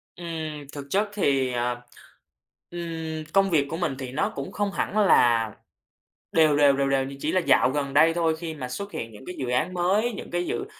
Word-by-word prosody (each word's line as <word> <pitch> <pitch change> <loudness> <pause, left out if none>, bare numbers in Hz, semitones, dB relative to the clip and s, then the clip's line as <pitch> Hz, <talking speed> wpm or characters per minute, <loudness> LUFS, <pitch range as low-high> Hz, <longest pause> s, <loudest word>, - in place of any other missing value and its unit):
Ừm, 160 -4 -5
thực 145 -1 -7
chất 205 +6 +1
thì, 135 -10 +1
ờ, 120 0 -1 0.9
ừm, 165 -2 -5
công 195 0 +4
việc 145 -5 +2
của 160 - -3
mình 165 -6 -1
thì 130 -2 -5
nó 195 +10 0
cũng - - -5
không 205 0 -1
hẳn 200 - -2
là 120 - +4 0.8
đều 155 -2 +4
đều, 145 -1 +6
đều 140 0 +1
đều. 135 -1 +2
Nhưng 135 +1 -8
chỉ 155 - 0
là 185 - +3
dạo 135 -5 +4
gần 140 0 -2
đây 160 +3 +5
thôi, 165 -2 +1
khi 165 -1 -5
mà 130 -5 -6
xuất 200 +11 -5
hiện 115 -9 -5
những 110 +4 -13
cái 180 - -7
dự 125 -2 -4
án 155 +9 0
mới, 195 +7 +1
những 205 - -8
cái 175 0 -1
dự 400 - -3
160 Hz, 215 wpm, -25 LUFS, 135-175 Hz, 0.9 s, đều